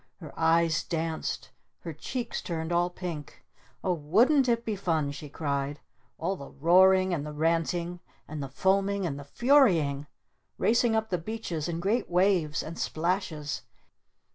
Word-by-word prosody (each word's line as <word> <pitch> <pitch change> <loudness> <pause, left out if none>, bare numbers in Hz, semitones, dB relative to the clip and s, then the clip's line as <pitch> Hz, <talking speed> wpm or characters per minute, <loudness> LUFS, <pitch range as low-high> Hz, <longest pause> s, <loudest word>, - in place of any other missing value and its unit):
Her 160 -5 -10
eyes 165 0 +3
danced! 165 -1 -3 0.3
Her 165 - -6
cheeks 240 - -4
turned 160 -1 -4
all 175 +1 +2
pink! 175 -5 -7 0.4
"Oh 185 - +2
wouldn't 235 - +3
it 235 0 +1
be 220 - -1
fun?" 160 -7 0
she 145 +1 -8
cried. 140 -1 -2 0.4
"All 185 +4 -1
the 140 - -9
roaring! 185 +4 +4
And 150 -4 -1
the 150 - -6
ranting! 170 +3 0 0.3
And 155 -1 -5
the 135 - -5
foaming! 195 +5 +1
And 145 -4 -3
the - - -7
Furying! 165 - +3 0.5
Racing 235 0 +3
up 220 -1 -1
the 180 - +1
beaches 175 -5 -4
in 165 -1 -2
great 205 +7 0
waves! 180 -4 +2
And 165 +2 -7
splashes! 160 -4 -2
170 Hz, 150 wpm, -28 LUFS, 155-195 Hz, 0.5 s, roaring